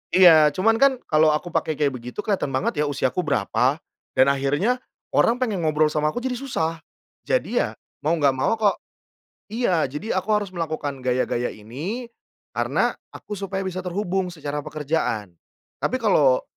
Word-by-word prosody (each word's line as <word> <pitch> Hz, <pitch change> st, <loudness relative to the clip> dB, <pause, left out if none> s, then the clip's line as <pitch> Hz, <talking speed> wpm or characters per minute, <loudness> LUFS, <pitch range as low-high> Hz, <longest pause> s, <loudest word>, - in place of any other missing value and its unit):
iya 165 Hz, -5 st, +8 dB
cuman 225 Hz, +4 st, +3 dB
kan 275 Hz, 0 st, +5 dB, 0.2 s
kalau 155 Hz, 0 st, +5 dB
aku 175 Hz, +3 st, -4 dB
pakai 155 Hz, -, 0 dB
kayak 145 Hz, -1 st, +1 dB
begitu 125 Hz, -, -6 dB
kelihatan 195 Hz, -9 st, -1 dB
banget 145 Hz, +3 st, 0 dB
ya -, -, 0 dB
usiaku 140 Hz, +4 st, 0 dB
berapa, 130 Hz, -, +1 dB, 0.4 s
dan 130 Hz, -, +5 dB
akhirnya 145 Hz, -, +1 dB, 0.4 s
orang 235 Hz, +2 st, +4 dB
pengen 215 Hz, -9 st, -1 dB
ngobrol 155 Hz, 0 st, +3 dB
sama 150 Hz, 0 st, +1 dB
aku -, -, -3 dB
jadi 260 Hz, -1 st, -1 dB
susah. 165 Hz, -12 st, -2 dB, 0.5 s
Jadi -, -, 0 dB
ya -, -, -1 dB, 0.3 s
mau 160 Hz, -, +3 dB
nggak 145 Hz, -4 st, +3 dB
mau 130 Hz, -, +2 dB
kok 205 Hz, -2 st, +3 dB, 0.8 s
iya 220 Hz, -9 st, +1 dB
jadi 150 Hz, -, -4 dB
aku 190 Hz, +4 st, -4 dB
harus 205 Hz, -2 st, 0 dB
melakukan 155 Hz, -4 st, -3 dB
gaya-gaya 125 Hz, -1 st, 0 dB
ini, 155 Hz, -, -6 dB, 0.5 s
karena -, -, +1 dB, 0.2 s
aku 210 Hz, -, -7 dB
supaya 195 Hz, 0 st, -3 dB
bisa 185 Hz, -1 st, -4 dB
terhubung 185 Hz, 0 st, -1 dB
secara 150 Hz, -3 st, -4 dB
pekerjaan. 145 Hz, -, -2 dB, 0.5 s
Tapi 255 Hz, -, +1 dB
kalau 145 Hz, -, +4 dB
160 Hz, 160 wpm, -23 LUFS, 140-195 Hz, 0.8 s, iya